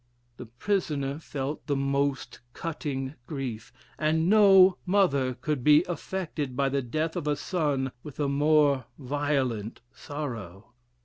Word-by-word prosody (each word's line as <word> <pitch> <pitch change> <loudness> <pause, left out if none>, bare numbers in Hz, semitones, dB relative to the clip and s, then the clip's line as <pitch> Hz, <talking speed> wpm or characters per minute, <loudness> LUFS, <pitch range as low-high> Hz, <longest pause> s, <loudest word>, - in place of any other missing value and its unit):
The 125 - -9
prisoner 140 - -2
felt 145 -2 -5
the 145 - +1
most 140 -1 -1
cutting 140 -4 -4
grief, 130 -7 -5 0.3
and 160 +2 +1
no 195 -3 +6
mother 140 -10 +2
could 135 +1 -3
be 150 +3 +6
affected 170 -6 -4
by 140 -1 +2
the 140 0 0
death 155 +6 -2
of 165 -4 -3
a 150 - +2
son 145 -6 -1
with 150 +1 -11
a 145 - +1
more 145 -2 +3
violent 135 -6 -2
sorrow. 115 - -7
145 Hz, 130 wpm, -27 LUFS, 130-155 Hz, 0.3 s, no